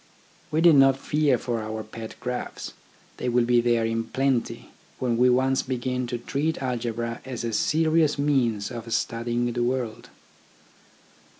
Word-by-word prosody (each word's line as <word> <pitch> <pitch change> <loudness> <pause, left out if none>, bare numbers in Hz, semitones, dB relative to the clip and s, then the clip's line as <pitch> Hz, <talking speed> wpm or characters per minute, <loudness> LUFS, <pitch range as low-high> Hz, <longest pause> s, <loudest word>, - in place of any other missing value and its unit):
We 155 - +1
need 165 -3 +7
not 135 0 +6
fear 145 -1 +1
for 120 -3 -3
our 110 0 -5
pet 110 +1 -9
graphs, 125 0 -5 0.4
they 125 - -2
will 120 0 +3
be 120 0 +4
there 120 -1 +2
in 115 0 -1
plenty 130 0 -1 0.3
when 125 -2 0
we 125 +2 +4
once 130 +2 +2
begin 125 -1 -2
to 120 - -3
treat 145 +6 -2
algebra 115 -2 -3
as 125 -3 -5
a 115 -1 -2
serious 155 +3 +2
means 130 -7 +1
of 115 -1 -7
studying 120 +2 -1
the 120 - -1
world. 120 -2 -2
125 Hz, 155 wpm, -25 LUFS, 115-135 Hz, 0.4 s, need